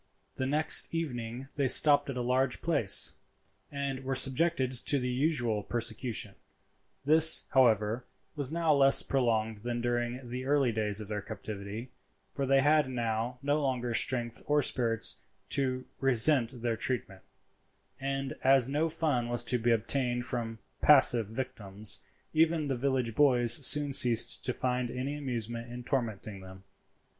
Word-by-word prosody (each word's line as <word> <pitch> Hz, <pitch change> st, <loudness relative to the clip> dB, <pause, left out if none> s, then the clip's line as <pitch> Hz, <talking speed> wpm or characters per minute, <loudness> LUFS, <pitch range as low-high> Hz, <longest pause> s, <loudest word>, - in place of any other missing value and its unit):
The 130 Hz, -, -4 dB
next 155 Hz, +3 st, +3 dB
evening 125 Hz, -5 st, -5 dB
they 140 Hz, -2 st, +1 dB
stopped 145 Hz, +2 st, +4 dB
at 135 Hz, -, -5 dB
a 125 Hz, -, -3 dB
large 130 Hz, +1 st, -1 dB
place, 145 Hz, -, +2 dB, 0.6 s
and 140 Hz, -2 st, -5 dB
were 135 Hz, 0 st, -3 dB
subjected 135 Hz, +1 st, 0 dB
to 130 Hz, +3 st, +2 dB
the 125 Hz, -1 st, -3 dB
usual 125 Hz, -6 st, -1 dB
persecution; 115 Hz, -2 st, -4 dB, 0.7 s
this, 160 Hz, +2 st, +6 dB
however, 115 Hz, -2 st, +1 dB, 0.3 s
was 145 Hz, -2 st, -3 dB
now 165 Hz, -1 st, +1 dB
less 135 Hz, -1 st, +7 dB
prolonged 110 Hz, -5 st, -1 dB
than 120 Hz, +2 st, -4 dB
during 120 Hz, +1 st, -3 dB
the 125 Hz, +2 st, -6 dB
early 140 Hz, -3 st, +1 dB
days 105 Hz, -2 st, -2 dB
of 105 Hz, -, -9 dB
their 105 Hz, -1 st, -5 dB
captivity, 105 Hz, +5 st, -8 dB, 0.4 s
for 140 Hz, -1 st, -3 dB
they 135 Hz, 0 st, +3 dB
had 150 Hz, -1 st, +2 dB
now 120 Hz, 0 st, -3 dB
no 145 Hz, +2 st, 0 dB
longer 125 Hz, -3 st, -2 dB
strength 120 Hz, -1 st, -1 dB
or 150 Hz, 0 st, +2 dB
spirits 115 Hz, -3 st, 0 dB, 0.3 s
to 130 Hz, -2 st, -2 dB
resent 125 Hz, -1 st, +3 dB
their 120 Hz, -2 st, -1 dB
treatment, 105 Hz, -7 st, -4 dB, 0.8 s
and 135 Hz, 0 st, -4 dB
as 135 Hz, -2 st, +5 dB
no 150 Hz, +4 st, -1 dB
fun 150 Hz, -7 st, -2 dB
was 120 Hz, 0 st, +2 dB
to 125 Hz, +1 st, -1 dB
be 120 Hz, +1 st, -1 dB
obtained 120 Hz, +2 st, 0 dB
from 115 Hz, -3 st, -5 dB, 0.2 s
passive 125 Hz, -6 st, +5 dB
victims, 105 Hz, -3 st, -2 dB, 0.3 s
even 160 Hz, -1 st, +1 dB
the 135 Hz, -, -1 dB
village 130 Hz, -2 st, -2 dB
boys 125 Hz, -3 st, +3 dB
soon 145 Hz, +1 st, +6 dB
ceased 120 Hz, -3 st, +2 dB
to 125 Hz, -, 0 dB
find 125 Hz, 0 st, -3 dB
any 130 Hz, +4 st, -5 dB
amusement 120 Hz, -4 st, -6 dB
in 125 Hz, 0 st, -8 dB
tormenting 110 Hz, -6 st, -4 dB
them. 95 Hz, 0 st, -13 dB
125 Hz, 150 wpm, -29 LUFS, 115-140 Hz, 0.8 s, less